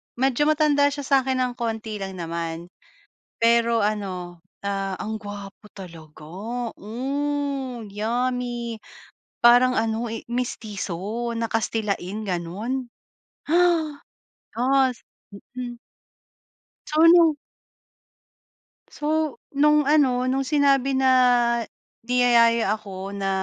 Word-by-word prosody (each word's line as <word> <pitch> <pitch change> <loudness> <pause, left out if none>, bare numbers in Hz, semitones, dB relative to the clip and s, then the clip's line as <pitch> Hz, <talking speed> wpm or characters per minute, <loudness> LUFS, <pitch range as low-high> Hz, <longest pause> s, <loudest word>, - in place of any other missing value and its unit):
medyo 265 +3 +1
matanda 300 -2 +3
siya 285 0 -3
sa 275 +1 +2
akin 260 0 -1
ng 250 -1 0
konti 220 -2 -3
lang 195 -1 -5
naman. 170 0 -5 0.7
Pero 230 -1 +3
ano, 185 -4 -3 0.2
ah, 195 -1 -2
ang 220 +1 -4
gwapo 205 0 -9
talaga, 165 -5 -12 0.6
hmm, 270 0 -3
yummy. 240 +2 -2 0.6
Parang 245 +2 +6
ano 225 +1 -1
eh, 225 - -6
mestiso 220 -2 -4
na 230 0 -1
kastilain 215 -2 -2
ganun. 205 +9 -3 0.6
Ha! 315 - +2 1.0
Yes, 260 0 +2 0.6
mm. 245 -1 -5 1.1
So 310 +1 +2
nung 335 -2 +6 1.5
so 310 -1 -1 0.2
nung 300 +1 +4
ano 270 -4 +3
nung 260 +1 +1
sinabi 275 -2 +2
na 265 0 +4 0.9
niyayaya 235 -3 +4
ako 195 -2 -7
na 195 -1 -2
235 Hz, 95 wpm, -24 LUFS, 205-265 Hz, 1.5 s, Parang